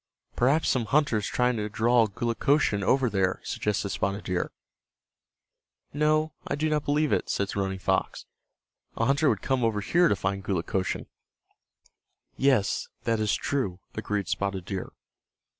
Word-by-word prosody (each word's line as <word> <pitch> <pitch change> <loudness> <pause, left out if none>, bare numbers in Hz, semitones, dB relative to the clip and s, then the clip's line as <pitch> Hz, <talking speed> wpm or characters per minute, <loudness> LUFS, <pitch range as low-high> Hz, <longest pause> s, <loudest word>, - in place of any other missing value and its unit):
"Perhaps 140 +6 +2
some 125 -4 +1
hunter 140 -2 +2
is 105 - -2
trying 125 -1 +1
to 105 0 -2
draw 115 +2 +3
Gulukochsun 115 +1 +1
over 130 +6 +3
there," 95 -3 0
suggested 105 -1 -2
Spotted 100 +2 -2
Deer. 90 -1 -2 1.4
"No, 155 +1 +2
I - - -1
do 155 +2 0
not 150 -1 0
believe 150 0 +2
it," - - 0
said 100 0 -1
Running 95 -1 -1
Fox. 95 - -1 0.7
"A 115 - +1
hunter 140 +3 +3
would - - -1
come 130 -2 0
over 110 -2 +1
here 175 - +3
to 100 - +2
find 95 +1 -2
Gulukochsun." 95 0 -2 1.3
"Yes, 130 -7 +2 0.2
that 115 -1 +1
is 105 -1 +1
true," 120 -11 -2
agreed 105 -3 -2
Spotted 95 -2 -2
Deer. 95 -1 -5
110 Hz, 145 wpm, -27 LUFS, 100-140 Hz, 1.4 s, draw